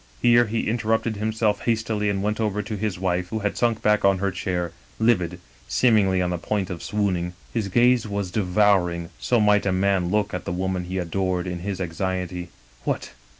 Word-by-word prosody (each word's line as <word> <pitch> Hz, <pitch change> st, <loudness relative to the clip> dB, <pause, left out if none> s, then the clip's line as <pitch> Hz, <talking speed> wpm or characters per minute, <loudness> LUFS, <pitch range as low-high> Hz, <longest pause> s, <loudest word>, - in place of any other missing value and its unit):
Here 120 Hz, 0 st, +5 dB
he 115 Hz, +1 st, -1 dB
interrupted 110 Hz, -1 st, 0 dB
himself 110 Hz, -1 st, 0 dB
hastily 110 Hz, -2 st, 0 dB
and 100 Hz, -1 st, -1 dB
went 105 Hz, +1 st, -1 dB
over 105 Hz, -1 st, 0 dB
to 105 Hz, +1 st, -4 dB
his 105 Hz, -2 st, -2 dB
wife, 90 Hz, -1 st, -1 dB
who 110 Hz, -, -2 dB
had 105 Hz, -, 0 dB
sunk 115 Hz, -2 st, 0 dB
back 105 Hz, 0 st, +3 dB
on 100 Hz, -1 st, +4 dB
her 100 Hz, +1 st, 0 dB
chair^ 90 Hz, -3 st, -2 dB, 0.3 s
livid, 90 Hz, -6 st, +1 dB, 0.3 s
seemingly 100 Hz, -6 st, +3 dB
on 90 Hz, -, -1 dB
the 90 Hz, -, -2 dB
point 100 Hz, 0 st, -2 dB
of 85 Hz, -, -5 dB
swooning. 90 Hz, -4 st, -1 dB
" -, -, -27 dB
His 110 Hz, -4 st, -1 dB
gaze 120 Hz, +3 st, +3 dB
was 100 Hz, -3 st, -3 dB
devouring; 90 Hz, -4 st, +2 dB
so 120 Hz, -, +2 dB
might 105 Hz, -1 st, +3 dB
a -, -, +2 dB
man 95 Hz, -1 st, +1 dB
look 105 Hz, +1 st, 0 dB
at 90 Hz, -, -4 dB
the -, -, -3 dB
woman 90 Hz, 0 st, -2 dB
he 95 Hz, +1 st, -4 dB
adored, 90 Hz, +1 st, -1 dB
in 90 Hz, -1 st, -4 dB
his 95 Hz, +1 st, -4 dB
anxiety. 90 Hz, 0 st, -3 dB, 0.3 s
"'What! -, -, -2 dB
100 Hz, 195 wpm, -24 LUFS, 90-110 Hz, 0.3 s, Here